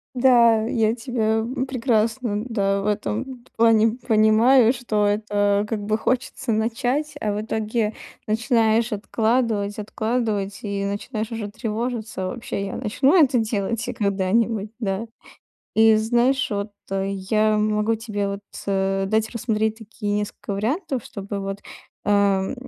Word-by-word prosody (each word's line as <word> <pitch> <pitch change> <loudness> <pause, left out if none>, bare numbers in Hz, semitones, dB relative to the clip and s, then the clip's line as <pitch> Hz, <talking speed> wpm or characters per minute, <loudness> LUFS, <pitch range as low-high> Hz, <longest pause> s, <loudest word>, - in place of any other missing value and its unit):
Да, 235 -3 +5
я 225 -1 +2
тебя, 225 -2 -1
м, 250 +4 -2
прекрасно, 230 -3 0
да, 200 -3 0
в - - -5
этом 235 +4 -3
т - - -25
плане 225 0 +4
понимаю, 225 +2 +5
что 220 -4 0
это 205 -1 +1
как 220 -3 -2
бы 215 +1 +1
хочется 255 +2 -1
начать, 245 +7 0
а 210 - 0
в 205 - -2
итоге 220 0 -1 0.3
начинаешь 225 +1 +2
откладывать, 220 0 0
откладывать 215 -2 -2
и 200 -1 -2
начинаешь 215 +3 -4
уже 215 -3 -4
тревожиться: 220 -2 -3
вообще 200 -1 -4
я 195 - -5
начну 260 +4 +1
это 255 -3 +2
делать 225 +1 -2
и 250 - -3
когда-нибудь, 205 +1 0
да? 200 0 -2 0.7
И 220 0 +6
знаешь, 240 +4 +2
вот, 200 0 -3 0.2
э, 195 0 -1
я 215 +2 +1
могу 210 +1 +1
тебе 210 -3 -3
вот, 200 0 -4 0.3
э, 195 0 0
дать 220 +2 0
рассмотреть 220 -2 -1
такие 215 -1 -5
несколько 205 0 -3
вариантов, 250 - -2
чтобы 200 0 -6
вот, 195 0 -4 0.5
эм. 200 -1 +2
220 Hz, 140 wpm, -23 LUFS, 205-235 Hz, 0.7 s, И